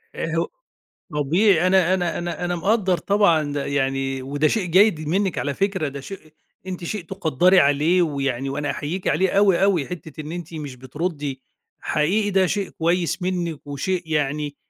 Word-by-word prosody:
أهو -, -, -1 dB, 0.7 s
طبيعي 170 Hz, +5 st, +3 dB
أنا 185 Hz, -1 st, +4 dB
أنا 175 Hz, -2 st, -1 dB
أنا 175 Hz, 0 st, -4 dB
أنا 175 Hz, 0 st, -1 dB
مقدّر 195 Hz, -1 st, +1 dB
طبعًا 170 Hz, -8 st, +2 dB
ده 145 Hz, -1 st, -2 dB
يعني، 135 Hz, -1 st, -1 dB
وده 145 Hz, +3 st, +1 dB
شيء 210 Hz, -5 st, 0 dB
جيد 175 Hz, -3 st, +3 dB
منِّك 190 Hz, +1 st, 0 dB
على 140 Hz, -1 st, -2 dB
فكرة، 195 Hz, -4 st, 0 dB
ده 140 Hz, 0 st, -7 dB
شيء 155 Hz, +1 st, -11 dB, 0.3 s
أنتِ 180 Hz, -2 st, -5 dB
شيء 190 Hz, 0 st, -4 dB
تُقدّري 180 Hz, 0 st, +3 dB
عليه 150 Hz, +5 st, +3 dB
ويعني 135 Hz, -4 st, -1 dB
وأنا 145 Hz, +2 st, -2 dB
أحييكِ 170 Hz, +6 st, -3 dB
عليه 190 Hz, 0 st, +2 dB
أوي، 195 Hz, -2 st, +3 dB
أوي، 185 Hz, -8 st, +2 dB
حتّة 160 Hz, -4 st, -8 dB
إن 155 Hz, +1 st, -6 dB
أنتِ 170 Hz, -1 st, -7 dB
مش 145 Hz, -5 st, -6 dB
بتردّي 140 Hz, 0 st, -4 dB, 0.4 s
حقيقي 205 Hz, +8 st, +1 dB
ده 190 Hz, -1 st, +3 dB
شيء 195 Hz, 0 st, -1 dB
كويس 170 Hz, +2 st, -1 dB
منِّك 175 Hz, -5 st, -3 dB
وشيء 170 Hz, +6 st, -2 dB
يعني، 150 Hz, -1 st, -1 dB
170 Hz, 165 wpm, -22 LUFS, 145-185 Hz, 0.7 s, أنا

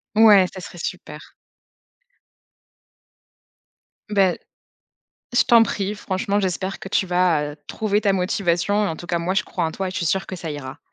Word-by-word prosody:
Ouais, 210 Hz, -3 st, +7 dB
ça 190 Hz, -, -8 dB
serait 175 Hz, -1 st, -10 dB
super. 155 Hz, -3 st, -6 dB, 2.9 s
Bah 195 Hz, -3 st, +3 dB, 1.0 s
je 240 Hz, -, +5 dB
t'en 235 Hz, -3 st, +6 dB
prie 205 Hz, -2 st, -2 dB
franchement 200 Hz, +1 st, -1 dB
j'espère 190 Hz, 0 st, -2 dB
que -, -, -8 dB
tu 195 Hz, -1 st, 0 dB
vas, 175 Hz, -5 st, +1 dB
heu, -, -, -14 dB
trouver 210 Hz, -1 st, 0 dB
ta 200 Hz, -2 st, +2 dB
motivation 190 Hz, +2 st, +1 dB
et -, -, 0 dB
en 160 Hz, -, -3 dB
tout 175 Hz, -, -10 dB
cas 170 Hz, -, 0 dB
moi 170 Hz, +2 st, -1 dB
je 195 Hz, -, +1 dB
crois 180 Hz, -, -3 dB
en 160 Hz, -, -2 dB
toi 190 Hz, +3 st, -3 dB
et -, -, -5 dB
je -, -, -9 dB
suis 170 Hz, -, -2 dB
sûre 190 Hz, +4 st, 0 dB
que 190 Hz, -, -5 dB
ça 165 Hz, -3 st, -5 dB
ira. 140 Hz, -2 st, -8 dB
185 Hz, 180 wpm, -22 LUFS, 170-200 Hz, 2.9 s, Ouais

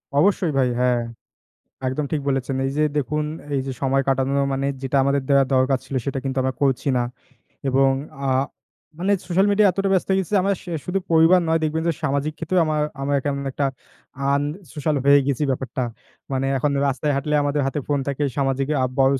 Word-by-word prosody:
অবশ্যই 170 Hz, +2 st, +3 dB
ভাই, 130 Hz, -2 st, +3 dB
হ্যাঁ। 125 Hz, -1 st, +2 dB, 0.9 s
একদম 130 Hz, +3 st, -1 dB
ঠিক 155 Hz, -, 0 dB
বলেছেন। 135 Hz, -1 st, 0 dB
এই 135 Hz, -, -1 dB
যে, 155 Hz, -, +3 dB
দেখুন, 150 Hz, +2 st, 0 dB, 0.3 s
এই 135 Hz, -, +1 dB
যে, 135 Hz, -, -3 dB
সময় 135 Hz, 0 st, +2 dB
কাটানোর 135 Hz, +1 st, +1 dB
মানেই 135 Hz, +1 st, 0 dB
যেটা 135 Hz, +1 st, 0 dB
আমাদের 140 Hz, +1 st, +1 dB
দেওয়া 140 Hz, -1 st, +5 dB
দরগার 130 Hz, 0 st, +3 dB
ছিল 135 Hz, -, -6 dB
সেটা 135 Hz, -1 st, -2 dB
কিন্তু 135 Hz, -1 st, -3 dB
আমরা 130 Hz, 0 st, 0 dB
করছি 135 Hz, 0 st, +1 dB
না 120 Hz, -, +1 dB, 0.7 s
এবং, 135 Hz, +1 st, +4 dB, 0.4 s
আ -, -, +2 dB, 0.7 s
মানে 195 Hz, +3 st, +2 dB
সোশাল 185 Hz, +2 st, +3 dB
মিডিয়া 205 Hz, 0 st, +5 dB
এতটা 195 Hz, +2 st, -1 dB
ব্যস্ত 185 Hz, -, +1 dB
হয়ে 190 Hz, 0 st, +3 dB
গেছি 190 Hz, -, -4 dB
যে, -, -, +5 dB
আমাদের 195 Hz, 0 st, +1 dB
সে 175 Hz, -, -7 dB
শুধু 185 Hz, +2 st, 0 dB
পরিবার 165 Hz, +3 st, +6 dB
নয় 165 Hz, 0 st, +2 dB
দেখবেন 160 Hz, +1 st, 0 dB
যে, 170 Hz, -, +2 dB
সামাজিক 140 Hz, +3 st, 0 dB
ক্ষেত্রেও 175 Hz, +2 st, +1 dB
আমার, 155 Hz, -1 st, 0 dB, 0.2 s
আমার 140 Hz, +1 st, +1 dB
কেমন 140 Hz, -1 st, -1 dB
একটা 140 Hz, +2 st, -1 dB, 0.7 s
আনসোশাল 150 Hz, 0 st, -2 dB
হয়ে 140 Hz, 0 st, +7 dB
গেছি 140 Hz, +1 st, 0 dB
ব্যাপারটা। 130 Hz, 0 st, -3 dB, 0.5 s
মানে 135 Hz, 0 st, 0 dB
এখন 145 Hz, +2 st, +1 dB, 0.2 s
রাস্তায় 140 Hz, +2 st, 0 dB
হাঁটলে 150 Hz, +2 st, 0 dB
আমাদের 145 Hz, 0 st, 0 dB
হাতে 135 Hz, +2 st, -1 dB
ফোন 145 Hz, -1 st, +1 dB
থাকে। 140 Hz, +1 st, -1 dB
সামাজিকভাবে 135 Hz, -1 st, +1 dB
140 Hz, 190 wpm, -22 LUFS, 135-155 Hz, 0.9 s, হয়ে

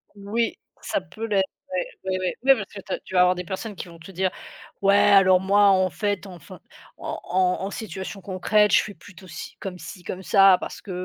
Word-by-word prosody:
Oui, 210 Hz, +4 st, -2 dB, 0.2 s
ça -, -, -2 dB
peut 225 Hz, 0 st, -7 dB
l'être, 195 Hz, -3 st, +2 dB, 0.3 s
ouais, -, -, 0 dB, 0.2 s
ouais, 190 Hz, 0 st, 0 dB
ouais, 185 Hz, -, -2 dB, 0.2 s
ouais, -, -, -1 dB
parce 205 Hz, -3 st, -7 dB
que 200 Hz, -, -8 dB
tu 190 Hz, -, -6 dB
as -, -, -2 dB
tu -, -, -14 dB
vas 180 Hz, -, +5 dB
avoir 180 Hz, 0 st, +4 dB
des 180 Hz, -, -5 dB
personnes 200 Hz, +3 st, -6 dB
qui 180 Hz, -, -7 dB
vont 170 Hz, -1 st, -13 dB
te 165 Hz, +4 st, -12 dB
dire: 185 Hz, 0 st, 0 dB, 0.5 s
«Ouais, 200 Hz, 0 st, +4 dB
alors, 190 Hz, -2 st, +6 dB
moi 200 Hz, +2 st, +4 dB
en 185 Hz, -1 st, +3 dB
fait, 205 Hz, 0 st, -2 dB
enfin, 180 Hz, -5 st, -12 dB, 0.4 s
en -, -, -5 dB
en 180 Hz, +1 st, +1 dB
en 200 Hz, -, -4 dB
situation 195 Hz, -3 st, -6 dB
concrète, 200 Hz, +2 st, +2 dB
je -, -, +7 dB
fais 205 Hz, -, -8 dB
plutôt 185 Hz, -1 st, -15 dB
c -, -, -8 dB
comme 185 Hz, -2 st, -6 dB
ci, 180 Hz, 0 st, -10 dB
comme 185 Hz, +1 st, -6 dB
ça 195 Hz, -2 st, +6 dB
parce -, -, -7 dB
que, 195 Hz, -, -9 dB
190 Hz, 230 wpm, -24 LUFS, 185-205 Hz, 0.5 s, je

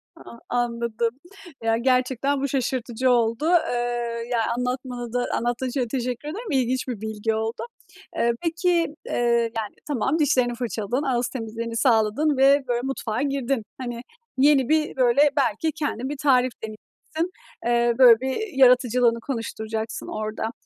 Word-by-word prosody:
A 235 Hz, -, -13 dB
anladım. 235 Hz, 0 st, -1 dB, 0.4 s
Ya, 225 Hz, 0 st, +2 dB
gerçekten 260 Hz, +2 st, +1 dB
bu 280 Hz, -, 0 dB
şaşırtıcı 255 Hz, -1 st, -1 dB
oldu. 230 Hz, +4 st, +1 dB, 0.2 s
Eee, 240 Hz, -1 st, -2 dB
ya 235 Hz, -, +1 dB, 0.2 s
anlatmana 250 Hz, -1 st, -4 dB
da 245 Hz, 0 st, 0 dB
anlattığın 240 Hz, +2 st, -1 dB
için 255 Hz, +1 st, -2 dB
de 240 Hz, -, -1 dB
teşekkür 250 Hz, +3 st, -3 dB
ederim. 420 Hz, +4 st, -6 dB
İlginç 255 Hz, -1 st, 0 dB
bir 230 Hz, -5 st, -5 dB
bilgi 220 Hz, 0 st, -2 dB
oldu. 220 Hz, +1 st, -3 dB, 0.6 s
E, 235 Hz, -, +3 dB
peki, 340 Hz, +1 st, 0 dB, 0.4 s
eee, 235 Hz, -1 st, +1 dB
yani, 215 Hz, -2 st, -4 dB
tamam, 290 Hz, +3 st, 0 dB
dişlerini 255 Hz, -5 st, +2 dB
fırçaladın, 240 Hz, +2 st, -2 dB
ağız 245 Hz, -3 st, 0 dB
temizliğini 230 Hz, -1 st, -5 dB
sağladın 245 Hz, +5 st, +2 dB
ve 275 Hz, +1 st, +5 dB
böyle 240 Hz, 0 st, 0 dB
mutfağa 255 Hz, -3 st, -3 dB
girdin. 275 Hz, -4 st, -1 dB, 0.2 s
Hani, 240 Hz, -1 st, -5 dB, 0.4 s
yeni 275 Hz, -1 st, +4 dB
bir, 310 Hz, -2 st, +1 dB
böyle, 260 Hz, +4 st, +4 dB
belki 275 Hz, +4 st, +1 dB
kendin 280 Hz, -4 st, -3 dB
bir 295 Hz, -, -4 dB
tarif 255 Hz, -3 st, +3 dB
denedin. 215 Hz, -1 st, -6 dB, 1.2 s
Böyle, 240 Hz, -3 st, +8 dB
bir 270 Hz, +5 st, -3 dB
yaratıcılığını 245 Hz, -2 st, +4 dB
konuşturacaksın 225 Hz, -3 st, -4 dB
orada. 215 Hz, +1 st, -4 dB
245 Hz, 140 wpm, -24 LUFS, 230-270 Hz, 1.2 s, Böyle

